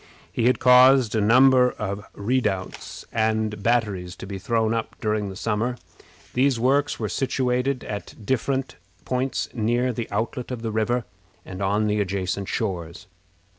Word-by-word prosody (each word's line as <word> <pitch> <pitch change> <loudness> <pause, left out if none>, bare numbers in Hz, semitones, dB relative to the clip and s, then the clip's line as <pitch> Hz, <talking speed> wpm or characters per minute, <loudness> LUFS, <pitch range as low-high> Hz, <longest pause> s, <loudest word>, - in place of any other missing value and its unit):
He 115 - -1
had 125 - +3
caused 125 -2 +6
a 110 - +1
number 125 +3 +5
of 100 0 -4
redoubts 100 -4 -2
and 110 -2 0
batteries 100 -6 0
to - - -9
be 95 0 -6
thrown 110 +2 0
up 115 -1 -3
during 105 -2 -1
the 95 - -8
summer. 115 +4 -1 0.6
These 130 -1 +2
works 140 +4 +1
were 110 - -1
situated 125 +3 -1
at 105 -1 -6
different 130 +2 -1 0.3
points 130 +1 -1
near 120 +2 0
the 115 0 -4
outlet 120 +2 -3
of 125 -3 -5
the 110 - -2
river, 115 +2 0 0.4
and 95 +1 -8
on 100 +2 +1
the 105 0 +1
adjacent 95 0 -2
shores. 90 -5 -3
115 Hz, 150 wpm, -24 LUFS, 105-125 Hz, 0.6 s, caused